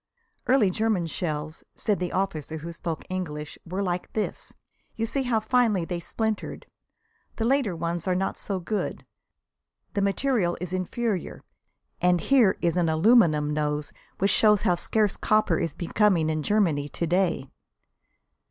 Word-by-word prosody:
"Early 240 -7 +4
German 215 -3 0
shells," 155 -1 -4
said 210 -3 0
the 180 -1 -2
officer 160 -5 -2
who 165 +2 -7
spoke 165 -1 -5
English, 155 -5 -5
"were 185 +4 -2
like 180 -1 -3
this. 215 - -3 0.4
You 225 - -1
see 270 +4 -1
how 245 -4 +1
finely 220 -5 +2
they 175 0 -3
splintered. 220 +5 -3 0.7
The 225 - -1
later 255 -7 +2
ones 170 +1 -3
are 185 - +2
not 190 +1 -1
so 195 -2 -3
good; 205 +4 -3 0.9
the 200 - 0
material 200 -2 +1
is 180 0 -5
inferior, 185 +2 -2 0.6
and 180 0 +4
here 240 -3 +4
is 170 +1 +2
an 170 -2 +2
aluminum 160 -4 +4
nose 150 0 -2 0.2
which 195 +1 +2
shows 210 -1 +4
how 180 - +3
scarce 210 +3 0
copper 215 -6 +2
is 165 -3 -2
becoming 175 -3 +2
in 155 0 -1
Germany 155 -6 +1
to 170 - -2
day." 175 -5 0
185 Hz, 150 wpm, -26 LUFS, 165-215 Hz, 0.9 s, Early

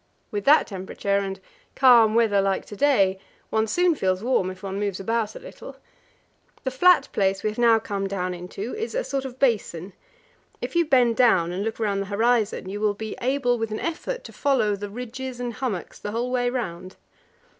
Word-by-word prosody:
With 205 -1 -3
that 300 +3 +6
temperature 200 +1 -2
and 195 -1 -4 0.4
calm 235 -4 +6
weather 220 -4 +3
like 195 -1 0
to 205 - -9
day 195 -8 +3 0.3
one 220 0 +1
soon 355 +8 +2
feels 190 -8 -1
warm 240 -7 +1
if 185 +1 -10
one 195 0 -4
moves 200 -2 -2
about 225 +2 -1
a - - -7
little.... - - -11 0.9
The 260 - -2
flat 360 +8 +5
place 195 -1 +1
we 215 - 0
have 215 - -8
now 230 -1 +5
come 200 -3 -3
down 185 -2 -2
into 185 +6 -6
is 445 +2 -4
a - - 0
sort 275 - -3
of 255 -1 -7
basin; 200 -8 0 0.7
if - - -6
you 340 0 +4
bend 250 -6 +3
down 190 -9 +4
and 185 +3 -3
look 225 +1 -3
round 200 -3 0
the 195 - -5
horizon, 220 -1 +1
you 205 +2 -5
will 210 -1 +1
be 220 +1 -6
able 245 -2 +1
with 225 -1 -2
an 215 - -4
effort 345 +9 -4
to - - -11
follow 240 -8 +1
the 205 +1 -6
ridges 250 +3 -6
and 245 -1 -3
hummocks 220 -8 -4
the 205 - -5
whole 235 +4 -2
way 245 -1 +1
round. 185 -7 -5
220 Hz, 200 wpm, -24 LUFS, 195-255 Hz, 0.9 s, that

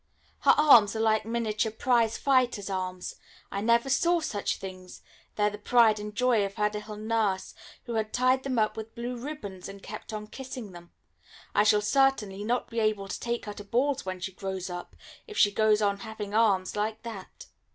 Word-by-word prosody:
Her - - +5
arms 235 -9 +7
are - - -2
like 220 -1 +2
miniature 225 -1 -1
prize 230 0 +2
fighter's 250 -7 +1
arms 185 -1 -4 0.3
I 200 - -2
never 235 +3 +3
saw 340 +6 +3
such 250 -11 -2
things; 185 -1 -9 0.3
they 210 - 0
are 210 - +4
the 210 - -8
pride 220 -1 +4
and 210 0 -7
joy 245 -3 +3
of 195 0 -4
her 210 -1 +1
little 210 0 -6
nurse, 215 -3 -1 0.3
who 235 - -6
had 220 -1 -1
tied 255 +1 +2
them 260 -2 -2
up 215 -1 +2
with 220 0 -8
blue 240 +1 -4
ribbons, 235 -9 -7
and 195 0 -11
kept 215 +2 -8
on 210 -1 -5
kissing 250 -2 -8
them. 175 -1 -13 0.6
I 205 - +4
shall 210 0 +4
certainly 210 -5 +1
not 240 +3 -1
be 230 - -3
able 215 -3 0
to - - -4
take 235 0 -3
her 210 - -5
to 205 - -9
balls 260 +7 0
when 185 -1 -5
she 185 +2 -4
grows 190 -1 -5
up, 175 0 -7 0.3
if 430 -2 -9
she 205 - +5
goes 215 0 +3
on 200 -1 +1
having 215 -2 -7
arms 205 -4 +2
like 215 +1 -2
that. 220 -5 -9
215 Hz, 200 wpm, -28 LUFS, 200-235 Hz, 0.6 s, arms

